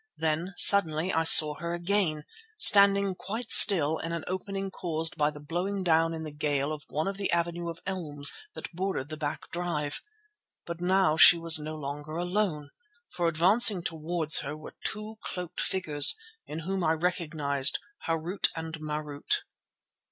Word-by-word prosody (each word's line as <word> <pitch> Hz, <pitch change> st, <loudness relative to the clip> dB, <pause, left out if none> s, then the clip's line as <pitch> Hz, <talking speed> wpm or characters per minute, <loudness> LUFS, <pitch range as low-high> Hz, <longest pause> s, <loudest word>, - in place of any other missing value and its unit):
Then 160 Hz, +4 st, -3 dB
suddenly 175 Hz, -3 st, +5 dB
I 165 Hz, -, 0 dB
saw 155 Hz, -2 st, +8 dB
her 170 Hz, +1 st, -5 dB
again, 175 Hz, -4 st, -1 dB, 0.3 s
standing 200 Hz, -, +5 dB
quite 220 Hz, +6 st, -8 dB
still 160 Hz, -6 st, +6 dB
in 165 Hz, +1 st, -5 dB
an 170 Hz, -, -5 dB
opening 195 Hz, +1 st, -6 dB
caused 165 Hz, -2 st, -2 dB
by 150 Hz, -2 st, 0 dB
the 150 Hz, -1 st, -11 dB
blowing 180 Hz, +6 st, -5 dB
down 165 Hz, -1 st, +1 dB
in 160 Hz, -, -8 dB
the 155 Hz, -, -8 dB
gale 145 Hz, 0 st, -2 dB
of 150 Hz, -1 st, -10 dB
one 155 Hz, +4 st, -3 dB
of 195 Hz, 0 st, -5 dB
the 200 Hz, -, -3 dB
avenue 170 Hz, 0 st, -3 dB
of 165 Hz, -, -10 dB
elms 150 Hz, -7 st, 0 dB, 0.2 s
that -, -, -9 dB
bordered 180 Hz, -6 st, -4 dB
the 155 Hz, -, -8 dB
back 150 Hz, 0 st, -6 dB
drive. 170 Hz, -5 st, -4 dB, 0.6 s
But 170 Hz, 0 st, -8 dB
now 185 Hz, -3 st, +1 dB
she 175 Hz, +2 st, +7 dB
was 165 Hz, -1 st, +1 dB
no 155 Hz, +1 st, -7 dB
longer 145 Hz, +1 st, -8 dB
alone, 175 Hz, -4 st, -3 dB, 0.4 s
for 175 Hz, -1 st, -2 dB
advancing 185 Hz, +4 st, +3 dB
towards 160 Hz, -1 st, -1 dB
her 150 Hz, +2 st, -7 dB
were 155 Hz, -, -12 dB
two 215 Hz, +1 st, -6 dB
cloaked 180 Hz, -1 st, -6 dB
figures 150 Hz, -6 st, +4 dB, 0.3 s
in 155 Hz, +2 st, -7 dB
whom 190 Hz, +2 st, -4 dB
I 160 Hz, 0 st, +1 dB
recognized 155 Hz, -5 st, 0 dB, 0.3 s
Harût 165 Hz, +4 st, -2 dB
and 160 Hz, 0 st, -7 dB
Marût. 150 Hz, -1 st, -4 dB
165 Hz, 160 wpm, -26 LUFS, 155-185 Hz, 0.6 s, saw